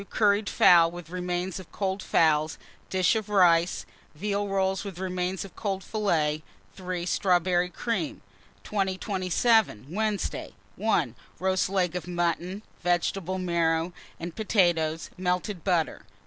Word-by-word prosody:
Curried 205 -1 +2
fowl 170 -2 +6
with 175 -1 -10
remains 180 0 -2
of 185 - -12
cold 195 -1 -2
fowls, 155 -3 +2 0.3
dish 185 +2 +3
of 215 -2 -2
rice, 175 -3 +4 0.3
veal 205 +4 -1
rolls 190 -1 0
with 195 -4 -7
remains 185 0 -2
of 195 - -13
cold 195 -3 -3
fillet. 160 -9 0 0.3
3. 180 -2 -4
Strawberry 180 -1 +2
cream. 240 - -3 0.4
2027. 195 - +1
Wednesday. 210 0 -2 0.2
1. 175 - +1 0.2
Roast 185 0 +1
leg 180 -3 0
of 180 - -4
mutton, 175 +3 -1 0.2
vegetable 175 +1 0
marrow, 170 -1 0 0.3
and 170 0 -6
potatoes, 170 -7 +1
melted 180 0 -1
butter. 175 -5 0
185 Hz, 120 wpm, -27 LUFS, 175-195 Hz, 0.4 s, fowl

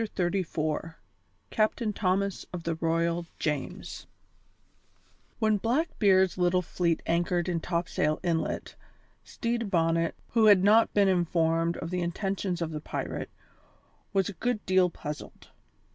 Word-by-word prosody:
CHAPTER 185 -5 -1
XXXIV 165 -3 -2 0.6
CAPTAIN 215 0 +1
THOMAS 195 0 -1
OF 180 -2 -6
THE 165 - -1
ROYAL 165 +1 0
JAMES 150 -3 -4 1.3
When 215 -2 +2
Blackbeard's 205 - +2
little 180 +1 +2
fleet 170 0 -1
anchored 175 +1 +1
in 175 -2 0
Topsail 170 -3 -1
Inlet, 165 -2 -1 0.5
Stede 235 -2 -3
Bonnet, 165 -2 +1
who 225 -2 +3
had 200 -3 +7
not 220 +3 +5
been 200 -1 +5
informed 165 -2 +1
of 165 - -5
the 180 -1 -1
intentions 180 0 -2
of 165 - -4
the 150 -1 -5
pirate, - - -4 0.8
was 195 -2 +1
a 205 - -5
good 240 +3 -2
deal 185 -1 +4
puzzled. 150 -3 -8
180 Hz, 130 wpm, -28 LUFS, 165-200 Hz, 1.3 s, had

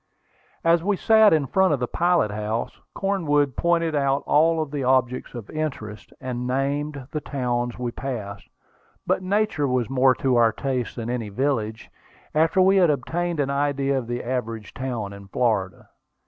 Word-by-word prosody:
As 165 0 +3
we 200 +1 +1
sat 220 0 +5
in 155 -3 +3
front 190 +1 +3
of - - -8
the 125 - 0
pilot 175 -9 +1
house, 105 +2 -3 0.2
Cornwood 145 -9 +1
pointed 170 -2 +1
out 140 -1 +1
all 160 +1 +3
the 140 -1 -4
objects 130 -1 +1
of 115 -4 -8
interest, 125 -9 -5
and 125 -1 -4
named 140 +2 -2
the 150 - -3
towns 120 -4 -2
we 120 -1 -3
passed. 110 -7 -6 0.6
But - - +1
nature 195 -5 0
was 125 -2 -1
more 130 -1 +4
to 130 -1 +1
our 115 -2 +4
taste 130 -2 -3
than 115 0 -4
any 115 -4 -3
village, 110 -2 -2 0.4
after 160 +4 +2
we 195 +1 +4
had 180 -3 +5
obtained 165 +4 -1
an 140 -1 0
idea 140 -1 0
of 130 -3 -2
the 120 0 -3
average 115 -4 -4
town 120 -6 -4
in 100 0 -11
Florida. 100 -3 -1
135 Hz, 165 wpm, -24 LUFS, 120-155 Hz, 0.6 s, sat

